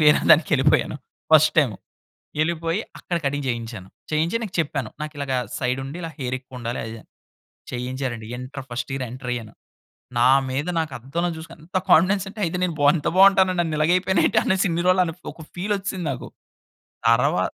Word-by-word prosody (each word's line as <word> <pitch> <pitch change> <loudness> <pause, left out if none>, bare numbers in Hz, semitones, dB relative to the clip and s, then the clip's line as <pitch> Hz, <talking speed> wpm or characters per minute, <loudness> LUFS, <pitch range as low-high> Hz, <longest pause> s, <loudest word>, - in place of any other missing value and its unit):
వేరే 150 -1 +6
దానికి 155 0 +6
ఎళ్ళిపోయాను, 135 0 +2 0.4
first 155 0 +7
time, 130 -9 +3 0.7
ఎళ్ళిపోయి 165 +4 -1 0.2
అక్కడ 175 - -2
కటింగ్ 140 0 -1
చేయించాను. 115 -5 -5 0.2
చేయించి 160 +6 +1
ఈనకు 215 -5 -6
చెప్పాను. 140 -7 -1
నాకిలాగ 145 -3 -4 0.3
సైడ్ 125 +1 0
ఉండి 140 +5 -7
ఇలా 165 - -4
హెయిర్ 130 -1 -2
ఎక్కువ 130 0 -12
ఉండాలి 120 0 -3
అదీ 115 - -6
ఇదీ 115 - -8
అని. - - -26 0.6
చేయించారండి. 125 -2 -4
ఇంటర్ 130 +2 -7
ఫస్ట్ 120 +2 -4
ఇయర్ 135 -1 -2
ఎంటర్ 125 0 -6
అయ్యాను. 115 -3 -7 0.7
నా 125 - +6 0.2
మీద 140 +5 -2
నాకు 155 -4 -2
అద్దంలో 160 +9 -2
చూసుకొని 160 -1 -11
ఎంత 180 +2 -2
కాన్ఫిడెన్స్ 190 +4 +5
అంటే 215 +2 -11
అయితే 170 +2 -2
నేను 180 -2 0
బావు 145 0 +6
ఇంత 150 - -3
బాగుంటానా 190 -1 +6
నన్ను 165 -3 0
ఇలాగ 155 +2 +3
అయిపోయానేటి 190 +4 +2
అనేసి 190 -1 +2
ఇన్ని 170 +1 0
రోజులు 185 0 +5
అని 165 - -4 0.2
ఒక - - -13
ఫీల్ 200 +4 -1
వచ్చేసింది 190 -3 -4
నాకు. 125 - -6 0.8
తర్వా - - +3
150 Hz, 180 wpm, -23 LUFS, 130-175 Hz, 0.8 s, ఫస్ట్